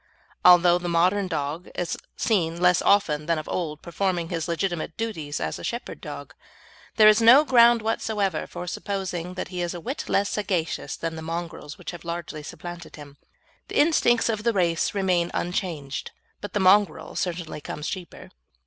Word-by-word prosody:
Although 175 -1 +7
the 175 0 -4
modern 185 +4 +2
dog 155 0 -3
is 175 - -2 0.2
seen 170 -6 0
less 180 0 +4
often 155 -7 +2
than 165 -1 +2
of 155 - -5
old 155 -4 -3
performing 175 -1 -1
his 165 -3 -3
legitimate 170 -1 -2
duties 160 -11 -3
as - - -3
a - - -9
shepherd 235 +1 -5
dog, - - -8 0.6
there 215 - +7
is 215 +1 +6
no 250 +7 +8
ground 235 -3 +5
whatever 210 -5 -1
for 180 - -7
supposing 180 -2 -4
that 185 - -5
he 180 -1 -4
is 175 0 -2
a - - -5
whit 260 - -5
less 200 0 +1
sagacious 185 -6 -2
than 165 -1 -4
the 160 - -7
mongrels 165 -2 -6
which - - -7
have 175 - -10
largely 170 -2 -5
supplanted 175 +3 -9
him. 145 -1 -12 0.5
The - - -4
instincts 290 -7 +3
of 220 -2 -1
the 235 0 +2
race 175 -1 +1
remain 180 -3 +1
unchanged; 170 -6 -3 0.3
but 205 - -7
the 205 - +1
mongrel 190 -3 +3
certainly 170 -4 -3
comes 150 +1 -6
cheaper. 185 -3 -7
175 Hz, 175 wpm, -25 LUFS, 165-200 Hz, 0.6 s, no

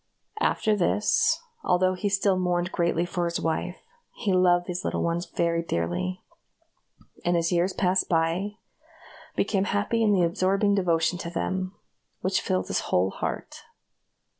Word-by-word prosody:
After 215 - +2
this, 205 +2 +2 0.2
although 185 +1 +3
he 195 +3 -1
still 195 0 +2
mourned 180 0 0
greatly 170 -1 +1
for 175 0 -2
his 170 0 -1
wife, 165 +2 -2 0.4
he 200 -4 -1
loved 175 -1 +4
these 180 +1 -4
little - - -1
ones 170 +1 -1
very 170 0 0
dearly; 90 - -2 1.0
and 175 0 +2
as 165 +1 0
years 175 +2 +2
passed 185 0 +1
by, 170 +5 0 0.8
became 200 -1 +1
happy 205 +3 0
in 215 -2 +4
the 190 -3 +3
absorbing 190 +4 +2
devotion 175 -3 +1
to 170 - -4
them, 185 +2 -3 0.5
which 190 0 +1
filled 95 0 -1
his - - 0
whole 95 +2 +2
heart. - - -5
180 Hz, 145 wpm, -26 LUFS, 170-195 Hz, 1.0 s, loved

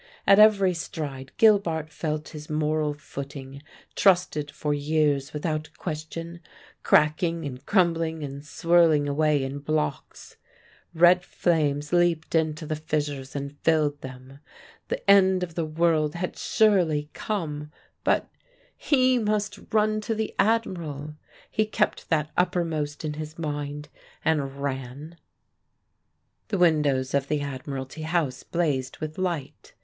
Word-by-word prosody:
At 195 - +6
every 200 -3 +6
stride 140 -5 -6
Gilbart 175 -8 +3
felt 155 -1 -3
his 150 0 -10
moral 150 -1 0
footing, 140 -1 -8 0.3
trusted 175 -6 +2
for 145 +1 -2
years 145 -1 +1
without 155 0 -3
question, 165 +1 -6 0.4
cracking 165 +2 +2
and 130 -2 -6
crumbling 165 -5 +1
and 140 0 -6
swirling 165 -2 +3
away 145 0 +2
in 135 +2 -4
blocks. 150 -1 -3 0.6
Red 175 +2 +6
flames 150 -4 0
leapt 175 -2 +2
into 155 -1 0
the 155 - -2
fissures 145 -3 -3
and 140 0 -5
filled 150 -3 +1
them. 130 +1 -10 0.5
The - - -4
end 190 -2 +5
of 170 -2 -5
the 160 -1 -2
world 155 -1 +1
had 180 +1 -3
surely 175 -9 +2
come; 150 -8 -4 0.3
but - - +2 0.5
he 255 -3 +3
must 210 -1 -1
run 215 0 +2
to 225 +1 -2
the 220 0 -3
Admiral! 170 -9 0 0.4
He 215 0 +1
kept 215 0 -1
that 155 -2 +1
uppermost 165 -5 -1
in 150 - -2
his 155 +1 -7
mind, 145 -2 -4 0.4
and 140 -3 0
ran. 140 +4 -5 1.3
The 210 - -1
windows 150 -7 +2
of 140 -1 +1
the 150 0 0
Admiralty 135 +1 -6
House 155 -5 -1
blazed 140 -7 -1
with 155 +2 -6
light. 160 -6 -4
155 Hz, 125 wpm, -26 LUFS, 145-175 Hz, 1.3 s, At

